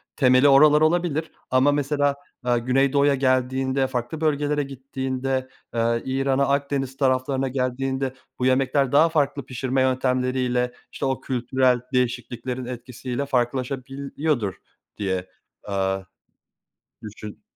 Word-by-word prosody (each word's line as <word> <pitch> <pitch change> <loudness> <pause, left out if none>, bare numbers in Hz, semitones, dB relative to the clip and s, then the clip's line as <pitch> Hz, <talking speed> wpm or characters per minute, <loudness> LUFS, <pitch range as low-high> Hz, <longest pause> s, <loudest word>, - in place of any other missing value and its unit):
temeli 130 0 +5
oralar 150 +2 +6
olabilir, 160 -1 +1 0.2
ama 130 +3 +4
mesela, 145 0 +1 0.3
aaa, 120 -1 +2
Güneydoğu'ya 135 +3 +3
geldiğinde 130 0 +1
farklı 130 +5 -4
bölgelere 150 -1 +1
gittiğinde, 130 -1 -3 0.2
eee, 115 0 +1
İran'a 135 +1 +1
Akdeniz 140 -1 -1
taraflarına 135 0 +1
geldiğinde 130 +1 -2 0.3
bu 125 - 0
yemekler 130 +1 +2
daha 155 +4 +5
farklı 145 -3 0
pişirme 130 +1 -1
yöntemleriyle, 125 -1 +1 0.2
işte, - - -4
o 135 -1 -1
kültürel 125 0 +1
değişikliklerin 125 0 -2
etkisiyle 125 +2 -5
farklılaşabiliyordur 135 -1 -1 0.4
diye, 95 -2 -2 0.3
aaa, 95 -1 -1 1.0
düşün 105 0 -9
130 Hz, 105 wpm, -24 LUFS, 125-140 Hz, 1.0 s, oralar